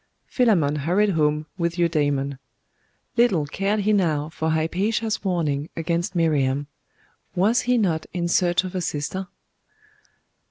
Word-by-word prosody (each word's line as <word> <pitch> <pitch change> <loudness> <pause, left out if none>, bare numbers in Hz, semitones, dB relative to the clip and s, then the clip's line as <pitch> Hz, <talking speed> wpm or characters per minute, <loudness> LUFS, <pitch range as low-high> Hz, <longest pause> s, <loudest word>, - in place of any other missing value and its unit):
Philammon 175 - +2
hurried 185 +8 +2
home 150 -2 +1
with 170 0 0
Eudaimon. 145 -5 0 0.8
Little 200 -11 +3
cared 200 +8 -1
he 215 +2 +2
now 155 -6 +1
for 160 0 -2
Hypatia's 200 +8 0
warning 160 -6 -1
against 170 +3 -1
Miriam.... 145 -4 +1 0.7
Was 215 +7 +3
he 250 - +4
not 170 -8 0
in 170 -1 -2
search 175 +1 +2
of 185 0 -6
a 185 - -2
sister? 175 +4 -3
170 Hz, 125 wpm, -23 LUFS, 150-195 Hz, 0.8 s, he